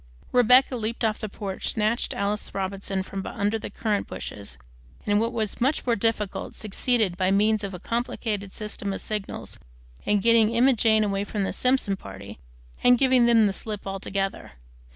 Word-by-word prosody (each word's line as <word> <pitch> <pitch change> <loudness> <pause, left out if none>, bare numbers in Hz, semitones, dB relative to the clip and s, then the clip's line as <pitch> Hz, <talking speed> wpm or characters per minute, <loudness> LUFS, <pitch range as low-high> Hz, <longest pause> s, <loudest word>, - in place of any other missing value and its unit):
Rebecca 250 +2 +5
leaped 230 +1 -2
off 215 -1 0
the 215 - -4
porch, 195 -1 -4
snatched 220 +2 0
Alice 205 0 -2
Robinson 195 0 -2
from 195 0 -6
under 205 +2 -1
the - - -6
currant 210 -3 -1
bushes, 100 -11 -7 0.5
and, 205 0 +3
what 230 +2 0
was 220 -3 -3
much 270 +5 +1
more 240 -2 +2
difficult, 210 -2 -2
succeeded, 215 -2 0
by 185 0 +2
means 210 +2 +2
of 195 -2 -4
a - - -8
complicated 215 -2 -3
system 205 -1 -4
of - - -4
signals, 210 -2 -5 0.4
in 210 - +2
getting 230 +1 +4
Emma 260 +3 +5
Jane 220 -2 +3
away 200 -1 0
from 205 0 -3
the - - -2
Simpson 250 -6 +1
party 100 - -10 0.4
and 245 0 +6
giving 255 -2 +4
them 230 -2 +5
the 200 - +1
slip 210 0 -6
altogether. 195 - -3
210 Hz, 175 wpm, -25 LUFS, 195-230 Hz, 0.5 s, and